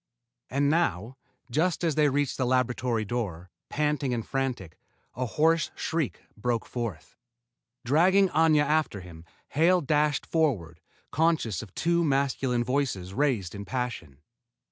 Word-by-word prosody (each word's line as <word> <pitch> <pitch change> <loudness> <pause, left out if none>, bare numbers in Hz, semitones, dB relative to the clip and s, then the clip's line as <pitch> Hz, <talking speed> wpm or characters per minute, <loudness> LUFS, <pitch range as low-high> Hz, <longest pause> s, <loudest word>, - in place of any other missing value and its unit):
And 140 +2 +1
now, 135 - 0 0.4
just 165 +7 +1
as 165 -2 +2
they 150 0 +3
reached 140 0 0
the 130 - +2
laboratory 125 -2 0
door, 95 -7 -4 0.2
panting 150 -4 0
and 115 - -4
frantic, 125 - -3 0.4
a 125 +1 -2
hoarse 160 +6 +2
shriek 160 -5 -2
broke 115 +1 -1
forth. 115 -10 -5 0.7
Dragging 185 +9 +4
Aña 155 -2 +4
after 150 -9 0
him, 85 -2 -12 0.2
Hale 175 +5 +3
dashed 150 0 +1
forward, 100 - -1 0.3
conscious 155 - +1
of 110 -5 -11
two 170 0 +1
masculine 135 -4 +1
voices 120 -8 -2
raised 115 -9 0
in 100 -1 -6
passion. 120 - -4
130 Hz, 130 wpm, -27 LUFS, 110-155 Hz, 0.7 s, Dragging